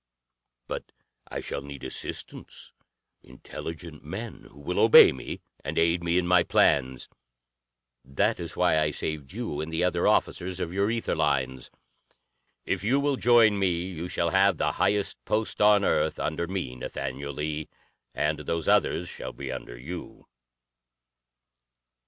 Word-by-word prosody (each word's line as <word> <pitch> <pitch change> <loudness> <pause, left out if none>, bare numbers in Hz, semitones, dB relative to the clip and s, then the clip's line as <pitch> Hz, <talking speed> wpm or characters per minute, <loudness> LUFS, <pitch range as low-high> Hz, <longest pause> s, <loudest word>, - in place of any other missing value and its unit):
"But - - -6 0.4
I - - -4
shall - - -4
need 70 -1 -9
assistance, 65 - -6 0.5
intelligent 80 +4 -9
men 105 +9 -7
who 70 - -17
will 70 - -2
obey - - +9
me 65 - -7 0.2
and - - -4
aid 85 +1 +2
me 85 +1 +1
in 90 - +2
my 90 0 +5
plans. 65 -6 +2 1.0
That 100 - 0
is 85 -1 -6
why 90 -3 +3
I 75 -1 +2
saved 75 -2 -4
you 105 -8 -4
and 80 +1 -5
the 80 +2 0
other 90 -1 +1
officers 90 +1 +1
of 85 -1 -3
your 100 +2 +1
ether 115 0 -1
lines. 65 -4 -1 1.0
If - - -2
you 125 +6 +2
will 140 0 +1
join 115 -5 +5
me, 90 -3 +1
you 85 0 -5
shall 85 -1 -1
have 95 -2 +4
the - - +1
highest 100 0 0
post 110 0 -1
on 105 -1 +5
Earth - - +1
under 80 +2 -2
me, 90 -9 -4
Nathaniel 70 +3 -5
Lee, 75 +1 -4 0.5
and 75 +1 0
those 80 +2 -3
others 90 - +2
shall - - -7
be 70 -1 -6
under 65 -2 -7
you." 85 +7 -8
85 Hz, 150 wpm, -27 LUFS, 70-95 Hz, 1.0 s, obey